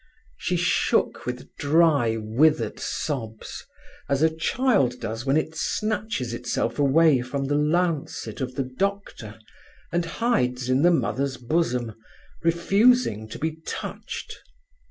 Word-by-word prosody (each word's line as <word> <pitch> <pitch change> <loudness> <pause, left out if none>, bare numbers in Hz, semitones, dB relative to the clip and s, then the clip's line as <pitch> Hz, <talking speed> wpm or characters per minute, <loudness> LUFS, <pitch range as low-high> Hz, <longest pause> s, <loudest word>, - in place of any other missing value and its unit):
She 180 - -1
shook 175 -6 +1
with 125 0 -6
dry, 145 -6 +3
withered 130 +9 +1
sobs, 115 -8 -4 0.5
as 140 +2 +2
a 160 0 +3
child 160 - +1
does 115 +2 -5
when 135 +3 +3
it 155 0 -1
snatches 210 - -2
itself 120 0 -2
away 145 -1 +4
from 135 +2 -3
the 140 - -1
lancet 155 -1 -1
of 130 -1 -3
the 135 - 0
doctor 130 - -4 0.5
and 170 0 0
hides 130 - 0
in 130 +2 +3
the 175 - +6
mother's 140 -5 0
bosom, 125 -3 -1 0.5
refusing 170 - +3
to - - -7
be 160 0 -3
touched. 160 - -6
145 Hz, 125 wpm, -25 LUFS, 125-165 Hz, 0.5 s, the